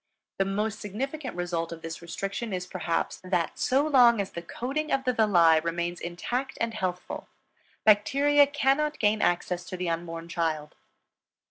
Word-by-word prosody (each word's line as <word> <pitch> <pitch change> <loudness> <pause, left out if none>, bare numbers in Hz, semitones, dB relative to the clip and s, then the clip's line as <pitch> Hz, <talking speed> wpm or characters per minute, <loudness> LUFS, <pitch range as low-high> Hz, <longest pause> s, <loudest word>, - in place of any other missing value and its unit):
The 195 - +3
most 210 +3 -2
significant 260 - -4
result 170 -2 -2
of 165 -1 -8
this 165 +1 -6
restriction 195 +5 -4
is, 180 -1 -3
perhaps, 175 -2 -2
that 180 -3 -1
so 270 +3 +2
long 245 -6 +6
as 195 -1 -2
the 170 - -6
coating 270 - -3
of 270 -1 +1
the 255 -1 +1
villi 175 -8 +5
remains 170 +1 -2
intact 240 +10 -3
and 230 0 -1
healthful, 185 -4 -4 0.6
bacteria 280 +8 +5
cannot 290 +1 +1
gain 215 0 +2
access 175 0 0
to 185 - -6
the 180 -1 -1
unborn 165 0 -4
child. 160 -3 -2
195 Hz, 155 wpm, -27 LUFS, 170-255 Hz, 0.6 s, long